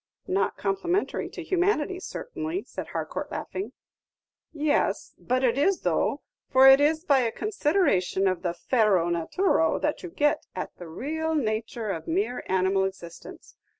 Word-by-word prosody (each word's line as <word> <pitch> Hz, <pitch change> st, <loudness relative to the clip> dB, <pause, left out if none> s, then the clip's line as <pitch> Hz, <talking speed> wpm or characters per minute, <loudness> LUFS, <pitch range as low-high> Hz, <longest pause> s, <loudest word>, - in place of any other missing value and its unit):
"Not 195 Hz, +1 st, 0 dB
complimentary 205 Hz, -, -1 dB
to -, -, -8 dB
humanity, 370 Hz, -1 st, 0 dB
certainly," 370 Hz, -3 st, -5 dB
said -, -, -7 dB
Harcourt, -, -, -4 dB
laughing. 385 Hz, -, -5 dB, 0.8 s
"Yes, 300 Hz, -1 st, 0 dB
but 255 Hz, +1 st, 0 dB
it 250 Hz, +1 st, +2 dB
is, 380 Hz, +6 st, +2 dB
though; -, -, 0 dB, 0.3 s
for 265 Hz, 0 st, +7 dB
it 270 Hz, +1 st, +8 dB
is 310 Hz, +2 st, +2 dB
by 280 Hz, -5 st, +4 dB
a 235 Hz, -3 st, +1 dB
consideration 295 Hz, -, +1 dB
of 185 Hz, -2 st, 0 dB
the 175 Hz, -1 st, -2 dB
fero 200 Hz, -9 st, +2 dB
naturo 170 Hz, -, +1 dB
that 300 Hz, -, -1 dB
you 360 Hz, -, -7 dB
get 295 Hz, -2 st, 0 dB
at 185 Hz, -, -5 dB
the 175 Hz, -, -9 dB
raal 320 Hz, -, -2 dB
nature 220 Hz, -4 st, -2 dB
of 165 Hz, -, -5 dB
mere 330 Hz, -7 st, -1 dB
animal 190 Hz, +1 st, +2 dB
existence. 175 Hz, -3 st, -8 dB
265 Hz, 150 wpm, -26 LUFS, -, 0.8 s, it